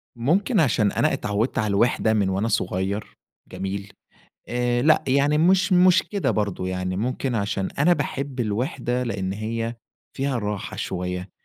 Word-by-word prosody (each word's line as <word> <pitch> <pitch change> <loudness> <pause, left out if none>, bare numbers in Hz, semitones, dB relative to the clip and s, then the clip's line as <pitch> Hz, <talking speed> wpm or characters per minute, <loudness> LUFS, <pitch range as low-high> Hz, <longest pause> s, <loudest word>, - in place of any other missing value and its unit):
ممكن 185 - +1
عشان 115 -8 +3
أنا - - +1
اتعودت 105 +5 -1
على 110 - +1
الوِحدة 110 +2 +2
من 100 -3 +2
وأنا 95 +4 0
صغير 95 -1 -2 0.3
جميل، 100 +1 -5 0.6
آآ، 120 0 0
لأ، 155 +3 +4
يعني 140 +3 +3
مش 185 +4 +3
مش 185 0 +6
كده 200 -2 -1
برضو، 100 -3 -1
يعني 90 0 -2
ممكن 125 +3 -2
عشان 100 -2 -1
أنا 165 +5 +5
باحب 140 -4 -2
الوِحدة 120 +3 -1
لأن 100 -5 -2
هي 115 +3 -3 0.4
فيها 135 -2 -1
راحة 105 -1 -4
شوية، 90 0 -4
115 Hz, 145 wpm, -24 LUFS, 100-135 Hz, 0.6 s, مش